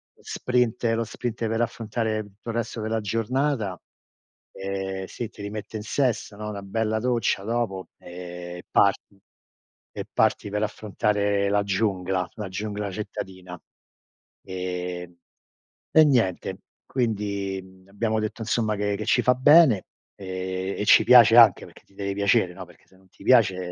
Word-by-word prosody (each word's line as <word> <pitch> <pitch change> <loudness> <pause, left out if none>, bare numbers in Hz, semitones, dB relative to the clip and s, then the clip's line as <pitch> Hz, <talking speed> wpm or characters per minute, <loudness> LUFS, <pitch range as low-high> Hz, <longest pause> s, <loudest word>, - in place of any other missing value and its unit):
lo - - -25
sprint 120 -2 0
lo 115 - 0
sprint 115 0 -4
per 115 +1 -1
affrontare 110 -1 -2
tutto 105 +3 -12
il 115 - -3
resto 115 -1 -3
della 110 0 -1
giornata, 115 -1 -1 0.7
ehm 95 0 -4
sì, 115 +3 -6
ti - - -13
rimette 105 +1 -6
in 105 - -6
sesto, 110 -4 -1
no, 105 0 -5
una 100 -1 -6
bella 110 +2 -1
doccia 120 -4 0
dopo, 110 -4 -2
ehm, 90 0 -8
parti 100 0 +2 0.7
e - - -5
parti 100 - +1
per 105 +1 -1
affrontare 105 -1 0
la 100 0 +2
giungla, 95 -3 -1
la 105 -3 -5
giungla 105 0 -4
cittadina. 95 -3 -7 0.8
Ehm, 90 -1 -5 0.7
e 160 - +7
niente, 95 -8 +1 0.3
quindi, 100 -5 -2
mhmm, 95 0 -19
abbiamo 110 +2 -1
detto 110 +2 -4
insomma 110 -1 0
che 105 0 -1
che 110 - -5
ci - - +3
fa 125 - +5
bene, 130 - +6 0.3
ehm, 95 0 -4
e 105 - -1
ci - - +7
piace 120 -1 +8
anche 115 -5 +7
perché, - - -17
ti 100 - -27
deve 100 -1 -3
piacere, 100 -3 +2
no, 95 0 -9
perché 85 -1 -21
se 95 - -23
non 95 0 -24
ti - - -17
piace, 95 -8 +3
105 Hz, 155 wpm, -25 LUFS, 95-115 Hz, 0.8 s, piace